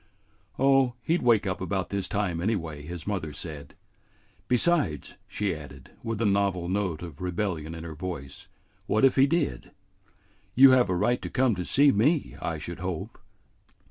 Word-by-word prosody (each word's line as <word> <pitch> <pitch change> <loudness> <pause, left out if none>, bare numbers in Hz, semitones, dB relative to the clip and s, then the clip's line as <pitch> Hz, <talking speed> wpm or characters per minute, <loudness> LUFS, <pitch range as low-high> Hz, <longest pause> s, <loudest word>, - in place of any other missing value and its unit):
"Oh, 135 -2 +3
he 165 - +2
'd - - -1
wake 115 -4 +3
up 95 -2 -3
about 95 +1 -2
this 100 -1 -2
time 95 -5 -1
anyway," 85 -7 -2
his 80 +2 -8
mother 95 -7 -3
said. 75 -2 -8 0.7
"Besides," 125 - +1
she 105 -2 -2
added, 70 -4 -11
with 115 -2 -3
a - - +1
novel 100 -3 +1
note 95 -4 -2
of 80 -3 -9
rebellion 90 -3 -3
in 80 - -8
her 85 -1 -7
voice, 75 -5 -7 0.4
"what 110 +4 +3
if 135 - +4
he 135 +1 +5
did? 155 - -1 0.9
You 135 +1 +9
have 125 -4 +4
a 90 - +1
right 115 +7 +1
to - - -5
come 130 -2 +2
to 90 -2 -3
see 140 +8 +4
me, 140 +9 +1
I 80 - -2
should 85 +4 -7
hope." 90 -3 -5
95 Hz, 175 wpm, -27 LUFS, 80-120 Hz, 0.9 s, You